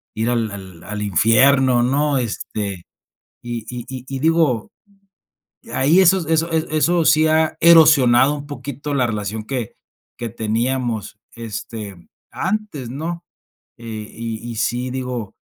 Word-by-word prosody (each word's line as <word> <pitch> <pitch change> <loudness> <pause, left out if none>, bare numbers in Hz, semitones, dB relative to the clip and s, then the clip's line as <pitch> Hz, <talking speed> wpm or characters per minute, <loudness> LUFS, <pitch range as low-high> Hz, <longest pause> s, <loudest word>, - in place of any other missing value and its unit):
ir 115 +2 -1
al 100 -7 -4
al 105 0 -5
infierno, 120 +6 +4
¿no? 140 +3 +1
Este, 105 -5 -4 0.6
y 120 -2 -5
y 125 -1 -7 0.2
y 135 0 -4
digo, 155 -7 +2 1.0
ahí 155 +8 +4
esos 185 -1 +4
eso, 165 +1 +1
eh, 160 0 +1
eso 165 +2 +2
sí 155 0 +5
ha 155 0 +2
erosionado 150 -6 +6
un 145 0 -8
poquito 145 +1 -6
la 130 -3 +2
relación 105 0 -4
que 120 -2 -4 0.4
que 120 - -4
teníamos, 115 0 -2 0.2
este, 110 -3 -7 0.3
antes, 190 - -3
¿no? 165 +6 -5 0.5
Eh, 110 -2 -7
y 115 0 -6
y 115 - -7
sí, 120 +3 -1
digo 125 -5 -5
125 Hz, 130 wpm, -20 LUFS, 110-150 Hz, 1.0 s, erosionado